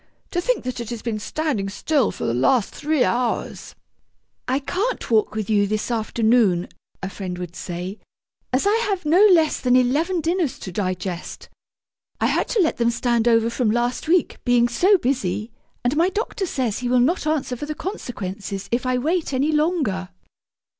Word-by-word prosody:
To 350 - 0
think - - 0
that 255 -1 -4
it 235 -2 -5
has 235 -2 -6
been 225 -3 -2
standing 250 -5 -2
still 270 +5 +1
for - - -5
the 115 - 0
last 195 - +2
three 300 -3 +1
hours!' 245 -1 -2 0.7
'I 260 - +1
can't 390 - -2
walk 215 -1 +2
with 215 -3 -2
you 205 -2 +2
this 215 +3 -2
afternoon,' 220 -5 +2 0.3
a 190 - -2
friend 185 -3 -5
would 175 -1 -7
say, 180 +3 -5 0.5
'as 255 +6 +1
I 410 +2 +4
have 400 -7 -1
no 335 +6 +4
less 330 -5 +4
than 250 -1 +2
eleven 295 +9 +2
dinners 330 -2 0
to 185 - -7
digest. 185 -1 -4 0.7
I - - +1
had - - +1
to 445 - +1
let 320 - +1
them 235 -1 +2
stand 235 0 +1
over 230 0 +3
from 235 -2 0
last 240 +5 0
week, 345 0 +2
being 245 -1 +4
so 370 +12 +4
busy, 225 - -1 0.3
and 245 +4 +1
my 340 +4 +3
doctor 400 -1 -3
says 250 -9 -1
he 250 -1 -2
will 250 0 +4
not 305 +6 +1
answer 300 -5 0
for 295 +5 -6
the 305 - -4
consequences 200 - -5
if 240 +2 0
I 255 0 +1
wait 315 +4 -1
any 275 +4 +1
longer!' 300 - 0
245 Hz, 180 wpm, -22 LUFS, 215-310 Hz, 0.7 s, I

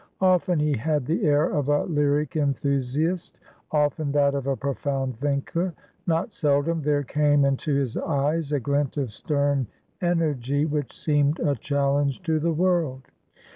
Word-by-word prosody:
Often 185 -1 +3
he 150 -1 +1
had 145 +3 -1
the 165 - -1
air 150 0 +4
of 145 -1 -1
a 145 0 +3
lyric 150 -2 0
enthusiast; 140 +3 -1 0.3
often, 150 -1 0
that 140 -1 +3
of 140 -1 -3
a 135 - +1
profound 135 -2 -2
thinker; 145 +5 -1 0.3
not 165 +5 0
seldom 150 +2 +1
there 145 0 +1
came 145 +1 +2
into 140 +2 0
his 135 -4 -1
eyes 150 +1 -1
a 145 - +1
glint 140 +2 -1
of 130 -7 -2
stern 140 -1 0 0.3
energy 150 -5 0
which 145 -3 -2
seemed 145 0 +1
a 145 -3 +1
challenge 140 - 0
to 160 -3 +1
the 165 +2 +1
world. 160 -6 0
145 Hz, 150 wpm, -25 LUFS, 140-155 Hz, 0.3 s, air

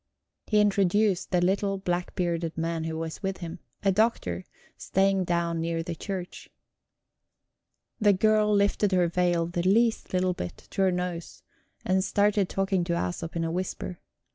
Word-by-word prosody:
He 210 - +3
introduced 200 -1 +2
the 180 -1 +2
little 195 +2 +1
black 175 -2 -2
bearded 170 -2 -1
man 165 0 -2
who 160 0 -3
was 160 0 -5
with 195 -1 -2
him; 170 0 -7 0.2
a 195 - +4
doctor, 185 - +1 0.3
staying 195 -1 +1
down 170 -1 0
near 165 0 -1
the 170 - -4
church. 185 +2 -6 1.5
The 210 -1 +5
girl 215 +2 +3
lifted 200 -1 +2
her 180 -2 +4
veil 175 -1 +1
the 175 +1 -2
least 220 +5 +2
little 185 0 +1
bit, 90 - -6
to - - -1
her 190 -1 +4
nose, 180 -2 -4 0.4
and 185 0 +2
started 205 -1 +2
talking 195 -2 0
to 170 - -1
Æsop 170 -1 -3
in 165 - 0
a 165 - -1
whisper. 180 0 -4
180 Hz, 160 wpm, -27 LUFS, 170-195 Hz, 1.5 s, The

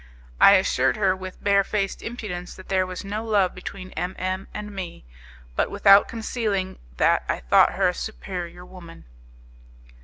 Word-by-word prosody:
I 200 - +8
assured 190 +2 +2
her 195 -3 +2
with 185 0 -9
barefaced 200 0 +1
impudence 180 -7 -6
that 185 - -14
there 185 -1 +1
was 185 +2 -7
no 210 +3 -3
love 205 -5 +2
between 185 0 -8
M 180 +1 -4
M 185 +1 -3
and 210 0 -7
me, 185 - -7 0.5
but - - +1
without 200 0 +6
concealing 215 -4 -3 0.2
that - - +3
I - - -1
thought - - +4
her - - +2
a - - -2
superior 175 - -6
woman. 170 -3 -13
190 Hz, 155 wpm, -24 LUFS, 180-200 Hz, 0.5 s, I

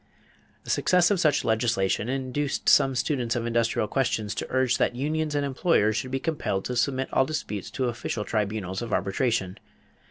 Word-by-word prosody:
The - - -4
success 180 +1 +3
of 200 - +2
such 155 -4 +2
legislation 110 -2 +1
induced 135 +2 -2
some 135 -2 +5
students 120 -1 0
of 120 -1 -2
industrial 115 -2 0
questions 115 -6 -1
to - - -4
urge 130 -1 +1
that - - +1
unions 150 +3 -1
and 145 -1 +1
employers 130 -6 +2
should 130 - -2
be 135 +1 -2
compelled 140 - -2
to 125 - -3
submit 130 +2 0
all - - +4
disputes 105 - -4
to 130 - -2
official 120 -3 -3
tribunals 100 -3 -2
of 115 -3 -4
arbitration. 100 -2 0
125 Hz, 170 wpm, -26 LUFS, 110-140 Hz, -, some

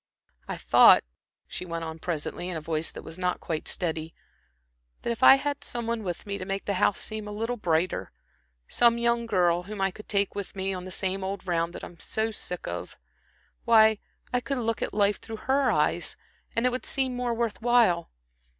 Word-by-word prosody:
"I - - -4
thought," - - +7 0.4
she - - -6
went 170 -2 -4
on 160 0 -6
presently, 175 +2 -3
in 175 - -3
a - - -2
voice 155 0 -2
that - - -9
was 165 +3 -8
not 180 -1 0
quite 160 -2 -4
steady, 165 -2 -2 0.9
"that - - -1
if 230 - -4
I 265 - +10
had 285 +1 -3
some 240 -1 -1
one 230 0 -1
with 180 -4 -5
me 200 -1 -4
to - - -4
make 195 +1 -3
the 200 - 0
house 200 - +3
seem 215 -1 -3
a - - -6
little 225 +4 -2
brighter 175 -4 0 0.6
some 235 -1 +4
young 235 0 +1
girl 175 -5 +2
whom 205 +3 -8
I 195 0 +1
could 210 +3 -13
take 200 -1 +1
with 200 0 -6
me 190 0 -2
on 180 -1 -6
the - - -7
same 190 +1 -1
old 190 0 -4
round 170 -1 0
that - - -8
I'm 170 - -10
so 220 +1 -1
sick 180 -4 -5
of - - -6 0.7
why, 220 -2 +6 0.3
I 250 - +3
could 275 +2 -2
look 230 -2 -1
at - - -1
life 205 0 +1
through 225 -1 -7
her 270 0 +3
eyes, - - 0 0.4
and 230 - +1
it 250 - +4
would 255 - -4
seem 260 -2 0
more 245 -1 -1
worth 230 -2 -2
while. 230 -8 +3
200 Hz, 210 wpm, -27 LUFS, 180-235 Hz, 0.9 s, I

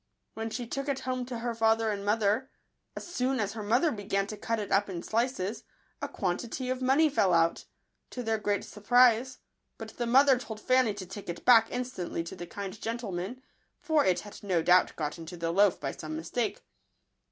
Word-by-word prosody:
When 225 0 -4
she 240 +2 -4
took 275 +4 -4
it 270 -1 -1
home 255 -1 -3
to 250 -2 -4
her 235 0 -2
father 225 -1 +2
and 200 -1 -4
mother, 215 +4 +1 0.5
as - - -6
soon 265 -6 -1
as 205 -1 -1
her 220 - -6
mother 240 +10 +2
began 195 -3 -1
to 215 - -6
cut 230 +2 -2
it 210 -2 -5
up 200 +1 +2
in 175 -2 -5
slices, 230 -3 -1 0.4
a - - -2
quantity 235 +7 -3
of 255 0 -3
money 270 +5 +4
fell 195 - +2
out, 165 0 +2 0.4
to 250 - -5
their 220 -1 0
great 205 -1 0
surprise; 245 +3 +3 0.4
but - - -7
the 240 - -1
mother 265 +1 +5
told 220 -4 -7
Fanny 255 -2 +2
to 195 -2 -6
take 195 +1 -9
it 170 - -6
back 225 -3 +7
instantly 245 -9 -3
to 165 - -8
the 175 - -8
kind 200 +3 -7
gentleman, 225 +1 -4 0.4
for 315 -2 +2
it 185 -2 +2
had 205 0 -11
no 185 -5 0
doubt 180 +1 +4
got 150 +1 -4
into 165 +2 -8
the 165 0 -1
loaf 200 +1 +3
by 135 -2 -3
some 155 0 -7
mistake. 230 - -3
220 Hz, 200 wpm, -29 LUFS, 195-250 Hz, 0.5 s, back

